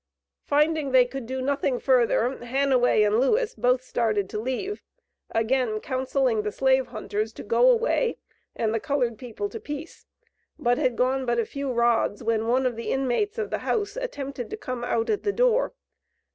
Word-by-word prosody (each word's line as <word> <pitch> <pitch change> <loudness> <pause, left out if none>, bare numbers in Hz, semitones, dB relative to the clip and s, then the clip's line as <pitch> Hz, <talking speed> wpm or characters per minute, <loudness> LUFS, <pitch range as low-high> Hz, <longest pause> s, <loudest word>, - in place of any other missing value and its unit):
Finding 300 0 +2
they 255 -1 +7
could 255 -1 -7
do 260 +1 -3
nothing 275 -1 0
further, 245 -1 +2
Hanaway 255 -3 +3
and 210 +2 +3
Lewis 440 - +2
both 250 - +1
started 215 -6 -1
to 210 - -3
leave, 260 - -3 0.5
again 225 -1 0
counselling 260 -2 0
the 210 0 -3
slave 265 +2 +2
hunters 215 -1 -3
to - - -9
go - - +4
away, 480 0 +2 0.4
and 220 -1 0
the 225 - 0
colored 245 -4 -1
people 250 - -4
to 450 - -7
peace, 295 -4 -8 0.5
but 245 +2 +1
had 255 -5 +1
gone 260 +2 +1
but 240 0 +1
a 230 - +1
few 280 +1 -4
rods, 235 -3 +1
when 225 -1 0
one 255 +2 +2
of 250 -2 0
the 230 - -5
inmates 270 - 0
of 440 -2 -3
the - - -1
house 415 -3 -1
attempted 280 - -5
to 430 - -5
come 255 - -5
out 230 -1 0
at 420 - 0
the 410 - 0
door. - - +2
255 Hz, 180 wpm, -25 LUFS, 235-290 Hz, 0.5 s, they